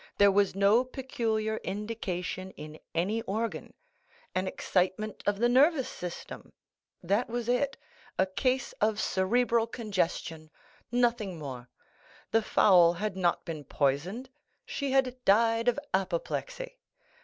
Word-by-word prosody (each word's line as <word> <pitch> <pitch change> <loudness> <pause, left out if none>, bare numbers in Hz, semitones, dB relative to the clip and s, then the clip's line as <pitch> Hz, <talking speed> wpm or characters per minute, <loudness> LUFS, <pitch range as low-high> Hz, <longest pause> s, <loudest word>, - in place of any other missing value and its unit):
There 200 0 +6
was 200 -1 +2
no 200 +5 +4
peculiar 225 -4 -2
indication 190 -3 -4
in 155 +1 -9 0.2
any 200 +7 0
organ—an 230 - -5
excitement 190 +4 -1
of 205 -1 +2
the 240 +3 +3
nervous 265 +2 +4
system—that 185 +3 -5
was 240 0 -3
it; 270 +3 +1 0.4
a 190 - +4
case 255 +7 -1
of 215 0 +2
cerebral 230 +5 +2
congestion—nothing 215 +2 -2
more. 130 -5 -7 0.6
The 225 - +4
fowl 180 -5 +5
had 205 +3 -3
not 180 -2 +1
been 160 -3 -5
poisoned—she 190 - -3
had 255 -2 +1
died 225 +3 +3
of 245 - +3 0.2
apoplexy. - - -2
215 Hz, 110 wpm, -29 LUFS, 185-245 Hz, 0.6 s, There